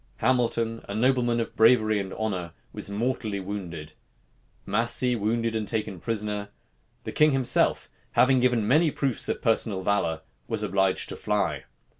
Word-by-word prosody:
Hamilton, 115 Hz, -2 st, 0 dB
a 100 Hz, -, -4 dB
nobleman 120 Hz, 0 st, +2 dB
of 115 Hz, -, -4 dB
bravery 110 Hz, -2 st, +4 dB
and 95 Hz, -1 st, -5 dB
honor, 95 Hz, -6 st, -3 dB, 0.2 s
was -, -, -4 dB
mortally 110 Hz, -1 st, -2 dB
wounded; 90 Hz, -6 st, -6 dB, 0.7 s
Massey 120 Hz, +3 st, +1 dB
wounded 115 Hz, +1 st, -1 dB
and 110 Hz, -2 st, -2 dB
taken 105 Hz, -5 st, -2 dB
prisoner; 105 Hz, 0 st, -2 dB, 0.5 s
the -, -, -5 dB
king 150 Hz, -1 st, +4 dB
himself, 130 Hz, -2 st, +2 dB, 0.3 s
having 130 Hz, 0 st, +4 dB
given 120 Hz, -4 st, +2 dB
many 155 Hz, +6 st, +4 dB
proofs 135 Hz, -4 st, 0 dB
of -, -, -3 dB
personal 110 Hz, -4 st, +1 dB
valor, 85 Hz, -5 st, 0 dB, 0.3 s
was -, -, -1 dB
obliged 95 Hz, 0 st, 0 dB
to -, -, -4 dB
fly. 90 Hz, -9 st, -1 dB
110 Hz, 145 wpm, -26 LUFS, 100-120 Hz, 0.7 s, bravery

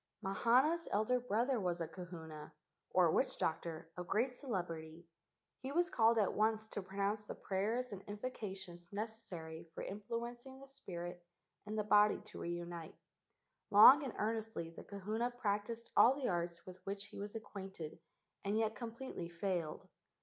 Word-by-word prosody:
Mahana's 255 Hz, -, +3 dB
elder 220 Hz, +5 st, +3 dB
brother 245 Hz, +2 st, +1 dB
was 175 Hz, -3 st, 0 dB
a 165 Hz, -, -1 dB
kahuna, 160 Hz, -4 st, -8 dB, 0.4 s
or 175 Hz, -3 st, +5 dB
witch¬ -, -, +2 dB
doctor, 165 Hz, 0 st, -2 dB
of 180 Hz, -1 st, -5 dB
great 240 Hz, +7 st, +2 dB
celebrity. 170 Hz, -, -4 dB, 0.5 s
He 265 Hz, -, -5 dB
was 350 Hz, +4 st, +2 dB
called 230 Hz, -4 st, +5 dB
at 210 Hz, -3 st, +3 dB
once 220 Hz, 0 st, +2 dB
to 205 Hz, -, -3 dB
pronounce 200 Hz, +2 st, -1 dB
the -, -, -5 dB
prayers 220 Hz, +6 st, -1 dB
and 195 Hz, -2 st, -6 dB
invocations 195 Hz, -5 st, -5 dB
neces¬ 220 Hz, +2 st, -4 dB
sary 160 Hz, -2 st, -7 dB
for -, -, -4 dB
influencing 235 Hz, +5 st, -5 dB
the 275 Hz, -, -11 dB
spirit 175 Hz, -10 st, -7 dB, 0.4 s
and 215 Hz, +1 st, -3 dB
the 215 Hz, -, +2 dB
body 210 Hz, 0 st, +5 dB
to 215 Hz, -, -10 dB
reunite. 170 Hz, -1 st, -4 dB, 0.7 s
Long 220 Hz, +8 st, +10 dB
and 270 Hz, -5 st, -3 dB
earnestly 220 Hz, -6 st, -2 dB
the -, -, -10 dB
kahuna 210 Hz, +4 st, -2 dB
practised 230 Hz, -1 st, -2 dB
all 255 Hz, +3 st, +8 dB
the 275 Hz, -2 st, -1 dB
arts 170 Hz, -1 st, -2 dB
with 185 Hz, 0 st, -10 dB
which 200 Hz, +1 st, -4 dB
he 210 Hz, -, -10 dB
was 205 Hz, +2 st, -5 dB
acquainted 190 Hz, -7 st, -6 dB, 0.4 s
and 200 Hz, +2 st, +1 dB
yet 220 Hz, -1 st, +2 dB
completely 230 Hz, -5 st, -5 dB
failed. 170 Hz, -2 st, -2 dB
205 Hz, 155 wpm, -37 LUFS, 175-230 Hz, 0.7 s, Long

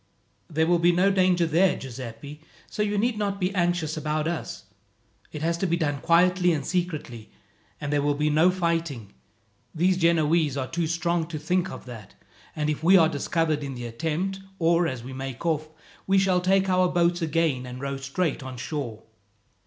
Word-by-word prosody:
"There 160 Hz, 0 st, +1 dB
will 175 Hz, +1 st, +3 dB
be 175 Hz, +1 st, +4 dB
no 185 Hz, +3 st, +3 dB
danger 185 Hz, -3 st, +3 dB
there, 170 Hz, +4 st, +3 dB
Giuseppi, 130 Hz, +3 st, -8 dB, 0.2 s
so -, -, -5 dB
you 210 Hz, 0 st, 0 dB
need 220 Hz, +1 st, 0 dB
not 200 Hz, -1 st, -1 dB
be 185 Hz, 0 st, -1 dB
anxious 175 Hz, -4 st, 0 dB
about 155 Hz, 0 st, -1 dB
us. 145 Hz, -, -4 dB, 0.7 s
It 150 Hz, -, -6 dB
has 170 Hz, +1 st, 0 dB
to 190 Hz, -, 0 dB
be 170 Hz, 0 st, +1 dB
done 145 Hz, -4 st, -1 dB
quietly 180 Hz, +1 st, +3 dB
and 145 Hz, -3 st, -3 dB
secretly, 155 Hz, -, -3 dB, 0.5 s
and 150 Hz, -1 st, -3 dB
there 145 Hz, -, +2 dB
will 145 Hz, 0 st, +1 dB
be 150 Hz, +1 st, +1 dB
no 160 Hz, +4 st, +5 dB
fighting. 165 Hz, -, -2 dB, 0.6 s
These 180 Hz, +3 st, +2 dB
Genoese 165 Hz, -3 st, +2 dB
are 130 Hz, -, -1 dB
too 165 Hz, +4 st, -2 dB
strong 170 Hz, 0 st, 0 dB
to 165 Hz, -2 st, -5 dB
think 180 Hz, +4 st, 0 dB
of -, -, -9 dB
that; 115 Hz, -6 st, -11 dB, 0.4 s
and 150 Hz, -1 st, -1 dB
if 150 Hz, 0 st, -2 dB
we 185 Hz, +3 st, +7 dB
are 160 Hz, -3 st, +5 dB
discovered 155 Hz, 0 st, -1 dB
in 135 Hz, -2 st, -5 dB
the 120 Hz, -1 st, -6 dB
attempt, 165 Hz, +10 st, -3 dB, 0.2 s
or 170 Hz, 0 st, +3 dB
as 130 Hz, -6 st, -5 dB
we 130 Hz, +2 st, -8 dB
make 135 Hz, +2 st, -6 dB
off, 155 Hz, -2 st, 0 dB, 0.4 s
we 195 Hz, 0 st, +3 dB
shall 190 Hz, -2 st, +3 dB
take 190 Hz, +1 st, +3 dB
to 190 Hz, -, -1 dB
our 185 Hz, 0 st, +3 dB
boats 175 Hz, 0 st, +1 dB
again 160 Hz, -6 st, 0 dB
and 125 Hz, 0 st, -7 dB
row 140 Hz, 0 st, -3 dB
straight 135 Hz, +4 st, -2 dB
on 130 Hz, -1 st, -7 dB
shore. 125 Hz, -5 st, -5 dB
165 Hz, 190 wpm, -25 LUFS, 145-180 Hz, 0.7 s, we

